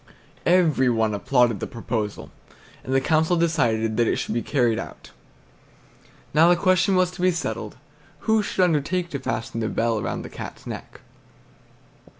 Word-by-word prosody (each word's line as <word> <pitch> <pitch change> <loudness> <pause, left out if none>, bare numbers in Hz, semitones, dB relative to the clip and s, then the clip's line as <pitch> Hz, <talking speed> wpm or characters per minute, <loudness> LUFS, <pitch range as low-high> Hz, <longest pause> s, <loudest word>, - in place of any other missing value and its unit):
Every 160 -8 +4
one 110 -2 +1
applauded 120 0 +2
this - - -5
proposal, 110 -3 -4 0.5
and 130 - -6
the 135 - +4
council 160 +5 +2
decided 120 -10 +1
that 120 -1 +3
it - - +2
should - - -3
be 120 - 0
carried 120 -5 +1
out. 70 - -9 1.2
Now 160 +3 +6
the 175 - +6
question 185 +2 +2
to 180 -1 0
be 185 - +4
settled 170 -1 -3
was, - - -25 0.4
who 220 -1 +2
should 190 -2 0
undertake 175 +2 0
to 140 - -3
fasten 115 -3 -3
the 110 -1 -1
bell 115 -2 0
round - - -4
the - - -8
Cat's - - -9
neck? - - -8
135 Hz, 160 wpm, -23 LUFS, 115-175 Hz, 1.2 s, Now